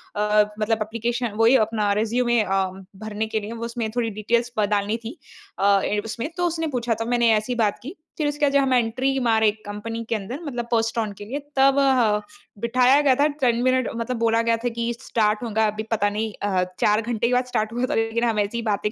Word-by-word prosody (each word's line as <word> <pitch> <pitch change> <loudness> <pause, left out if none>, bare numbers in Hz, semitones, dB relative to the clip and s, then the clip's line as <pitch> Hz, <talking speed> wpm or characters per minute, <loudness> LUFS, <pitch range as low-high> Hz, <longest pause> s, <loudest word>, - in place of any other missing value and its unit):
अ, 210 0 +3 0.2
मतलब 220 +1 0
एप्लीकेशन 235 +2 -3
वही 230 +3 +5
अपना 210 -2 0
रिज्यूमे 240 +1 +1
अ, 195 -1 +1 0.4
भरने 215 +1 -3
के 220 0 -1
लिए 215 +3 -6
वो 230 0 -5
उसमें 230 -2 -3
थोड़ी 230 -2 +1
डिटेल्स 235 +2 +1
प 210 - +4
डालनी 205 +2 -1
थी। 270 +10 -7 0.4
अ, 200 0 +4 0.2
उसमें 230 +7 -4
तो 355 0 +1
उसने 325 -1 -2
पूछा 235 -1 0
था - - -1
मैंने 240 -1 +3
ऐसी 240 +4 -3
बात 215 -3 0
की, 310 +9 -7 0.2
फिर 300 -2 0
उसके 290 0 0
बाद 280 - +1
जब 280 - +5
हम 265 -1 +1
एंट्री 255 +3 +1
मारे 220 -3 +3 0.2
कंपनी 225 +3 -5
के 230 - +1
अंदर 215 +7 -5
मतलब 240 -4 -4
पोस्ट 230 0 +1
ऑन 215 -2 -2
के 205 - -7
लिए 265 +7 -4 0.2
तब 270 +1 +5
ह 240 -6 +3 0.4
बिठाया 250 +4 +4
गया 270 -3 +4
था। 290 +3 +3 0.2
10 235 - -2
मिनट 255 -1 +2
मतलब 235 +1 -3
बोला 230 0 +2
गया 230 0 +2
था 245 +1 -2
कि 235 +1 -2
स्टार्ट 215 -2 0
होगा 220 -1 +1
अभी 215 +1 -3
पता 205 -2 +2
नहीं 215 +1 -3
अ, 190 -3 +1 0.2
4 210 +1 +3
घंटे 235 0 -1
के 250 - 0
बाद 250 0 +2
स्टार्ट 220 -3 -2
हुआ 245 +1 0
था - - 0
लेकिन 225 +1 0
हम 225 -2 +1
ऐसी 205 +3 -1
ही - - -1
बातें 210 -1 -1
230 Hz, 230 wpm, -23 LUFS, 215-245 Hz, 0.4 s, वही